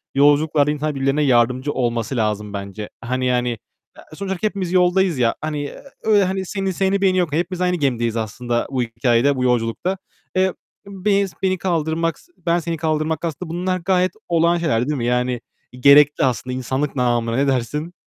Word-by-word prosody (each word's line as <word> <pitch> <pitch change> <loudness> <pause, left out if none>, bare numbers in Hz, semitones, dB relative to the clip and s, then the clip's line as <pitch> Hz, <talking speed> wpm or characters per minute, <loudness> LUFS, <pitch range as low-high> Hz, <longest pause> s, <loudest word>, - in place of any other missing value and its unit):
Yolculuklarda 145 +1 +4
insan 150 0 -2
birbirlerine 135 +2 +1
yardımcı 130 +2 +2
olması 120 0 -1
lazım 105 -2 -1
bence. 100 +1 -6
Hani 130 +2 -2
yani, 125 -2 0 0.5
a 155 - -10
sonuçta 190 +2 -2
hepimiz 195 -4 -3
yoldayız 180 -2 +3
ya, 115 -2 +2
hani 150 -2 -3 0.3
öyle 210 -2 +4
hani 190 0 -1
seni 195 0 -2
seni 195 +2 +1
beni 185 -1 +3
yok. 175 -5 +1
Hepimiz 175 +3 -2
aynı 180 0 +2
gemideyiz 120 -7 0
aslında 120 +2 -2
bu 130 -2 0
hikâyede, 120 +4 +2
bu 125 - -1
yolculukta. 125 +10 0 0.4
Eee, 185 0 +2 0.3
beni 200 0 0
s 185 - -15
beni 185 -1 +2
kaldırmak, 165 -2 -1 0.2
ben 170 0 0
seni 165 0 -3
kaldırmak 155 +1 -1
aslında 165 +1 -5
bunlar 180 +2 -1
gayet 185 +1 +1 0.2
olağan 170 0 +3
şeyler, 140 -7 0
değil 150 - -1
mi? 120 - -2
Yani 125 0 0 0.4
gerekli 145 +2 +6
aslında 125 0 -1
insanlık 130 +3 -2
namına. 120 -2 +1
Ne 140 +2 +2
dersin? 145 +6 -1
150 Hz, 170 wpm, -20 LUFS, 125-180 Hz, 0.5 s, gerekli